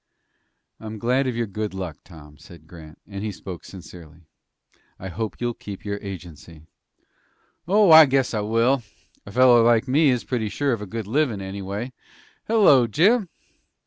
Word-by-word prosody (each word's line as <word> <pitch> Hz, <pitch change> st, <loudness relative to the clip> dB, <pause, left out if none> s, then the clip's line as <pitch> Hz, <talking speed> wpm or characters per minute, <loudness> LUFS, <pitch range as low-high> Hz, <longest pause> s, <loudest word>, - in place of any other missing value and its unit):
"I'm 110 Hz, 0 st, -8 dB
glad 125 Hz, +5 st, 0 dB
of 125 Hz, -, -2 dB
your 120 Hz, 0 st, -1 dB
good 105 Hz, -1 st, -5 dB
luck, 90 Hz, -6 st, -6 dB
Tom," 75 Hz, -4 st, -15 dB
said 85 Hz, -3 st, -16 dB
Grant, 80 Hz, -1 st, -14 dB
and 100 Hz, 0 st, -8 dB
he 110 Hz, -, -3 dB
spoke 90 Hz, -2 st, -9 dB
sincerely. 85 Hz, -3 st, -13 dB, 0.8 s
"I 95 Hz, -, -8 dB
hope 110 Hz, +4 st, -5 dB
you'll 120 Hz, 0 st, -2 dB
keep 100 Hz, -3 st, -10 dB
your 100 Hz, 0 st, -4 dB
agency." 85 Hz, -5 st, -10 dB, 1.0 s
"Oh, 200 Hz, -1 st, +4 dB
I 160 Hz, -1 st, +9 dB
guess 135 Hz, -2 st, 0 dB
I 110 Hz, -, -1 dB
will! 115 Hz, +5 st, +1 dB, 0.5 s
A -, -, -9 dB
feller 125 Hz, 0 st, +5 dB
like 115 Hz, +2 st, +3 dB
me 145 Hz, +3 st, +3 dB
is 125 Hz, -2 st, 0 dB
pretty 115 Hz, -4 st, -3 dB
sure 140 Hz, +3 st, -1 dB
of 115 Hz, -, -4 dB
a 105 Hz, -, -7 dB
good 110 Hz, +2 st, -5 dB
livin', 120 Hz, -1 st, 0 dB
anyway. 100 Hz, +5 st, -6 dB, 0.5 s
Hello, 190 Hz, -, +5 dB
Jim!" 190 Hz, -, +2 dB
110 Hz, 165 wpm, -23 LUFS, 95-130 Hz, 1.0 s, I